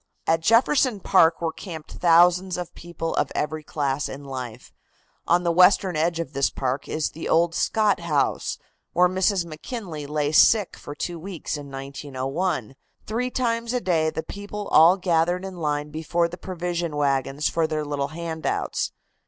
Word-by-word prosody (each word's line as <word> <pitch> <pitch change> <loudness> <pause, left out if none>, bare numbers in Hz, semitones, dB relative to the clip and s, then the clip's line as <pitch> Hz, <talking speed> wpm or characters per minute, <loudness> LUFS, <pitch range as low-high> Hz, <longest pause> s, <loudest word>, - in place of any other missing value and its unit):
At 165 0 +2
Jefferson 230 - +3
Park 165 -3 +4
were 165 -1 -1
camped 160 -6 -9
thousands 180 +2 +4
of 180 -2 -6
people 165 -1 -5
of - - +1
every 155 +1 -2
class 145 -2 -2
in 140 +2 -8
life. 130 -4 -7 0.5
On 175 +1 +3
the 170 - +2
western 180 +1 +5
edge 165 +2 0
of 155 -4 -4
this 140 0 +2
park 130 +1 -3
is 155 -1 -1
the 165 - -6
old 165 +1 +3
Scott 210 +2 +2
house, 155 -5 0 0.4
where 180 +1 +5
Mrs. 185 0 +1
McKinley 165 - -7
lay 150 0 -1
sick 205 +5 +5
for 145 - -9
two 170 +3 -4
weeks 175 -3 -5
in 145 -1 -8
1901. 135 - -3 0.3
Three 240 +4 -2
times 235 -2 -1
a 250 - +1
day 165 -7 +1
the 160 0 -4
people 205 0 -7
all 165 +4 +7
gathered 175 0 +1
in 190 -2 -7
line 150 -2 -2
before 165 +2 0
the 170 - -8
provision 175 -3 -4
wagons 140 0 0
for 165 -1 +1
their 155 -1 -2
little 145 -1 -2
handouts. 160 +1 -3
165 Hz, 165 wpm, -24 LUFS, 150-180 Hz, 0.5 s, all